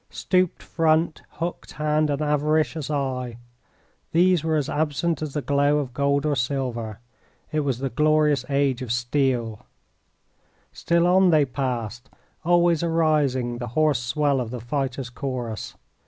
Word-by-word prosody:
Stooped 185 -2 0
front, 160 0 +1
hooked 170 +1 -5
hand 150 +1 +1
and 145 +1 -1
avaricious 150 0 0
eye 130 -5 -2 0.8
these 175 -1 +4
were 160 -1 +1
as 145 -3 0
absent 155 +1 -1
as 155 -2 -5
the 150 - -1
glow 145 +1 +2
of 135 -4 -3
gold 140 +1 +1
or 150 -1 +1
silver. 120 -4 -2 0.5
It 155 - 0
was 140 -5 0
the 135 0 -3
glorious 150 -1 +3
age 140 -2 +1
of 125 -3 -4
steel. 120 -2 0 1.1
Still 170 0 +1
on 185 +1 +5
they 155 -4 +4
passed, 125 -2 -4 0.3
always 175 -1 +3
arising 150 -7 +1
the 120 - -4
hoarse 155 -5 +3
swell 140 +2 +1
of 120 - -4
the 125 +1 -5
fighters' 130 +1 -3
chorus. 125 -5 -5
140 Hz, 140 wpm, -24 LUFS, 125-155 Hz, 1.1 s, on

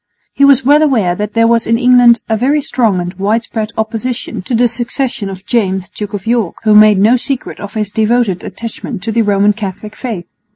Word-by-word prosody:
He 280 - +1
was 275 -2 +5
well 295 +3 +5
aware 230 - +2
that 210 +3 -5
there 230 0 +3
was 230 0 +1
in 230 0 +2
England 245 -2 +5
a 220 - 0
very 270 +7 +1
strong 235 -8 0
and 175 +1 -4
widespread 220 +1 -1
opposition 225 +2 -3
to 235 +6 -3
the 240 +2 +3
succession 235 -2 -3
of 190 0 -9
James 190 -6 -1
Duke 205 -1 -6
of 195 - -7
York, 230 -5 0
who 215 -1 +3
made 210 -1 +6
no 220 +6 +4
secret 265 +1 -4
of 205 +1 -9
his 210 -2 -2
devoted 220 -3 0
attachment 230 -3 -7
to 225 - -2
the 230 +1 +1
Roman 205 -1 +2
Catholic 210 0 -7
faith. 220 -9 -5
225 Hz, 205 wpm, -13 LUFS, 205-245 Hz, -, made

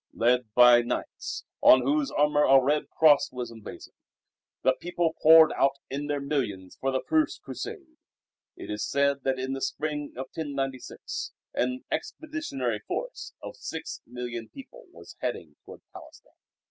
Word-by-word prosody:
Led 120 -1 +2
by 125 -1 +8
knights, 120 - -4 0.2
on 130 -1 +7
whose 145 +2 +1
armour 150 0 +2
a 135 -1 +7
red 145 +3 0
Cross 150 -3 +5
was 125 -2 -5
emblazoned, 115 -2 -11 0.7
the 130 - +4
people 175 -2 -1
poured 160 0 +8
out 135 0 +2 0.2
in 145 +2 -3
their 145 -1 -1
millions 120 -10 -3
for 135 - 0
the 130 - -1
first 315 -1 +1
Crusade. 350 -8 -8 0.6
It - - -7
is 105 0 -3
said 140 0 +1
that 135 -1 +1
in 130 +1 -3
the 135 - -5
spring 150 0 -3
of 130 - -5
1096 135 -4 -5 0.2
an 125 +1 -1
"expeditionary 295 - -3
force" 105 - -5
of - - -7
six - - -6
million 120 -1 -6
people - - -13
was - - -14
heading - - -4
toward - - -12
Palestine. - - -14
135 Hz, 150 wpm, -27 LUFS, 125-150 Hz, 0.7 s, by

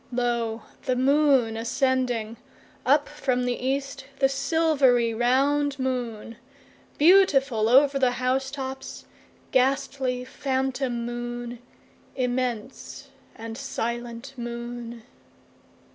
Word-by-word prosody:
2Lo! 235 -2 -1 0.2
the 255 -2 +1
moon 270 -3 +3
ascending! 240 -1 0 0.5
Up 285 +2 +4
from 255 -4 -1
the 245 - +1
east, 275 +1 -2
the 270 - +4
silvery 275 -4 +2
round 275 +5 +2
moon; 240 -4 -3 0.6
Beautiful 280 - +4
over 275 +2 +5
the 255 -2 +3
house 255 +2 0
tops, 265 -1 -7 0.5
ghastly 260 -1 0
phantom 260 -2 -2
moon; 240 0 -5 0.6
Immense 255 +1 -3 0.3
and 225 0 -7
silent 240 0 -4
moon. 235 -1 -6
255 Hz, 90 wpm, -25 LUFS, 240-275 Hz, 0.6 s, over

